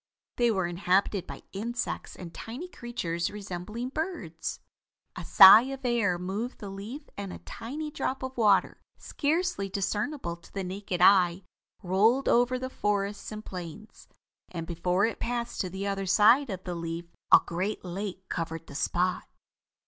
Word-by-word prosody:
They 240 -1 +3
were 190 -5 +1
inhabited 180 +2 +1
by - - -9
insects 235 +5 -4
and 175 -2 -9
tiny 250 +11 -7
creatures 175 - -3
resembling 210 +4 -5
birds. 270 - -4 0.6
A - - -6
sigh 195 +4 +10
of 270 -1 -6
air 225 -7 +2
moved 200 +8 -4
the 200 -3 -7
leaf 225 +10 -8
and 200 -2 -5
a - - -7
tiny 295 +7 -6
drop 265 -2 -3
of 260 0 -5
water, 210 -5 +3 0.2
scarcely 310 - -1
discernible 200 - -2
to 170 - -19
the 195 - -4
naked 185 -1 -4
eye 185 -1 +5 0.4
rolled 215 +9 +3
over 245 +1 +3
the 260 +1 -4
forests 205 -1 -2
and 215 0 -7
plains, 180 +3 -9 0.4
and 165 -2 -5
before 180 +4 +1
it 230 - -3
passed 240 0 -2
to 185 - -3
the 190 +2 -5
other 195 -1 -2
side 230 +8 +5
of 190 -2 -5
the 180 - -4
leaf 170 0 -4 0.3
a - - +10
great 185 +4 -3
lake 190 +1 -5
covered 165 -1 -4
the - - -12
spot. 180 +5 0
200 Hz, 155 wpm, -28 LUFS, 180-240 Hz, 0.6 s, sigh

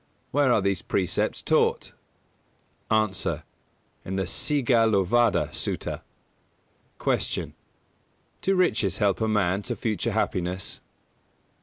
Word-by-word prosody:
Where 140 -2 +3
are 110 - +4
these 100 -2 0
precepts 90 -3 -1
taught? - - +1 1.0
A. 105 -3 0 0.6
In 95 - -4
the 95 - 0
Sigālovāda 115 - +2
Sutta. - - -3 1.0
213. - - 0
Q. - - -11 0.9
Do 195 - +2
riches 105 - +2
help 100 -1 +1
a 110 - +2
man 100 -3 +1
to 120 +3 -4
future 110 0 -1
happiness? 90 +1 -2
105 Hz, 105 wpm, -26 LUFS, 95-120 Hz, 1.0 s, are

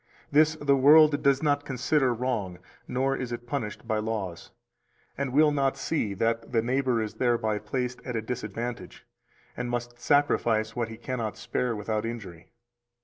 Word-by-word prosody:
This 155 +2 +4
the 145 -2 +2
world 150 +2 +6
does 140 +1 +3
not 145 -1 +2
consider 130 0 +1
wrong 115 -7 -2 0.3
[nor 135 +2 0
is 125 -2 -4
it 120 0 -5
punished 120 -4 -4
by 110 -2 0
laws], 105 -6 -4 0.7
and 140 -1 -2
will 150 +3 +5
not 140 -2 +1
see 110 -11 -1
that 115 +3 -1
the 115 -2 +2
neighbor 125 -2 +1
is 105 - -5
thereby 115 -4 0
placed 125 +3 -3
at 125 - -5
a 110 - 0
disadvantage, 115 +1 -5 0.5
and 125 0 -3
must 120 0 -4
sacrifice 115 -6 +2
what 120 -2 -2
he 110 - -8
cannot 115 -4 -4
spare 125 -2 -2
without 105 +1 -2
injury. 100 -8 -7
120 Hz, 160 wpm, -27 LUFS, 110-135 Hz, 0.7 s, world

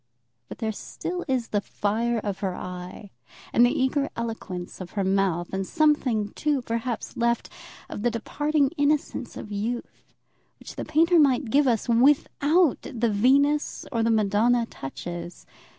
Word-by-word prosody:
But - - -8
there 220 -2 -2
still 355 - -5
is 255 -4 -1
the 205 - 0
fire 230 +4 -1
of 205 -3 -3
her 190 -3 -2
eye, 180 +3 -8 0.4
and 240 - +6
the 245 - +5
eager 275 +2 +1
eloquence 205 -7 -5
of 180 - -8
her 200 - 0
mouth, 190 -3 0
and 190 0 -1
something, 260 -9 +2
too, 290 +2 -1
perhaps, 230 0 -3
left 235 0 0 0.4
of - - -6
the 240 - +2
departing 285 +5 0
innocence 290 +1 0
of 210 - -8
youth, 225 +4 -4 0.6
which - - -11
the - - -5
painter 330 +3 +4
might 265 -5 +3
give 285 +2 +4
us 230 -4 +1
without 285 +6 +3
the 235 -3 -1
Venus 280 +8 +2
or 230 - 0
the 225 - +2
Madonna 220 +2 +3
touches. 175 +1 -7
235 Hz, 150 wpm, -25 LUFS, 205-280 Hz, 0.6 s, and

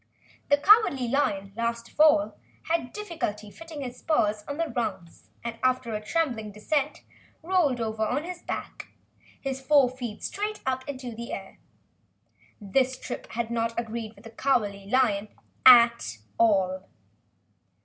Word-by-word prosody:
The 285 - +6
Cowardly 295 - +5
Lion, 200 -7 0
last 235 0 -2
of - - -25
all, 305 0 +5 0.3
had 320 -7 -1
difficulty 315 - -4
fitting 325 +1 -9
his 250 -2 -7
paws 215 -10 +1
on 285 - -4
the 330 0 0
rungs 190 -8 -4
and, 230 -1 -5
after 255 -3 +1
a 215 0 -3
trembling 235 -7 -1
descent, 285 +8 -2 0.4
rolled 325 -8 +2
over 220 -1 -2
on 255 +7 0
his 355 +1 -7
back, - - -6 0.5
his 270 -1 -4
four 280 -1 +5
feet 245 -4 -7
straight 420 +1 -3
up 260 0 -1
in 280 - -4
the 235 -1 -7
air. - - -8 1.0
The 255 +5 +1
trip - - -7
had 235 0 -2
not 230 0 -1
agreed 225 -1 -5
with 205 - -18
the 225 - -11
Cowardly 210 -6 0
Lion 220 -5 +2 0.4
at 235 - +7 0.2
all. 190 -4 +2
240 Hz, 145 wpm, -27 LUFS, 220-285 Hz, 1.0 s, at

